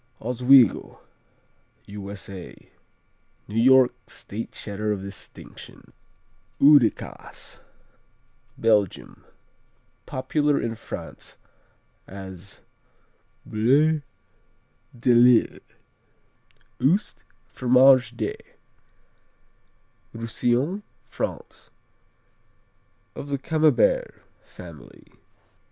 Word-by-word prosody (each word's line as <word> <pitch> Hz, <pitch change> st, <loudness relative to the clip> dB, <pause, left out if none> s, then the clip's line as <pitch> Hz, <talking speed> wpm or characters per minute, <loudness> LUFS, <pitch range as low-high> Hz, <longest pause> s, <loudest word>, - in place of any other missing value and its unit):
Oswego 125 Hz, 0 st, +3 dB, 0.9 s
U.S.A. 100 Hz, -2 st, -10 dB, 0.8 s
New 110 Hz, +2 st, -1 dB
York 130 Hz, 0 st, +5 dB
State 110 Hz, +3 st, -8 dB
Cheddar 105 Hz, +1 st, -4 dB
of 100 Hz, -2 st, -3 dB
distinction. 100 Hz, -1 st, -12 dB, 0.7 s
Oude 140 Hz, -5 st, +6 dB
Kaas -, -, -11 dB, 1.0 s
Belgium 105 Hz, -4 st, 0 dB, 0.8 s
Popular 145 Hz, +3 st, 0 dB
in 115 Hz, -, -3 dB
France 115 Hz, -, -10 dB, 0.7 s
as 95 Hz, -1 st, -10 dB, 0.8 s
Boule 145 Hz, +8 st, +2 dB, 1.0 s
de 125 Hz, +1 st, +3 dB
Lille. 120 Hz, 0 st, +4 dB, 1.2 s
Oust, 175 Hz, +10 st, 0 dB, 0.2 s
Fromage 125 Hz, -1 st, +4 dB
de 110 Hz, -3 st, -2 dB, 1.8 s
Roussillon, 120 Hz, -, -1 dB, 0.2 s
France -, -, -6 dB, 1.5 s
Of 145 Hz, -, -8 dB
the 140 Hz, -, -1 dB
Camembert 160 Hz, -, +1 dB, 0.3 s
family. -, -, -14 dB
120 Hz, 65 wpm, -24 LUFS, 105-140 Hz, 1.8 s, Oude